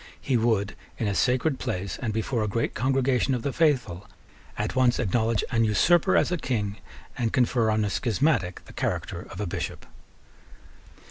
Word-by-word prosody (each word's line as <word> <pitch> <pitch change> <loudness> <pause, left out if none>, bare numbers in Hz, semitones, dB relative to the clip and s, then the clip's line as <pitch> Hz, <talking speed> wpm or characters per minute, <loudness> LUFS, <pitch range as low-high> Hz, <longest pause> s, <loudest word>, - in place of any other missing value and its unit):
He 135 - -1
would, 110 -3 +1 0.2
in 110 - -1
a 100 - 0
sacred 130 +6 +1
place, 100 -6 -3
and 115 -4 -1
before 110 +2 -1
a - - -1
great 115 +3 -1
congregation 130 0 +1
of 120 - -4
the 140 - -2
faithful, 125 - +1 0.5
at 105 +4 -2
once 125 -1 +3
acknowledge 115 0 +1
an 115 -2 +2
usurper 175 - +3
as - - +2
a 180 - +1
King, 105 -8 -2 0.4
and 115 -2 0
confer 125 -3 +2
on 110 0 +1
a - - -1
schismatic 115 - 0
the - - -14
character - - -3
of - - -9
a 105 - -1
Bishop. 85 - -5
115 Hz, 175 wpm, -26 LUFS, 105-130 Hz, 0.5 s, once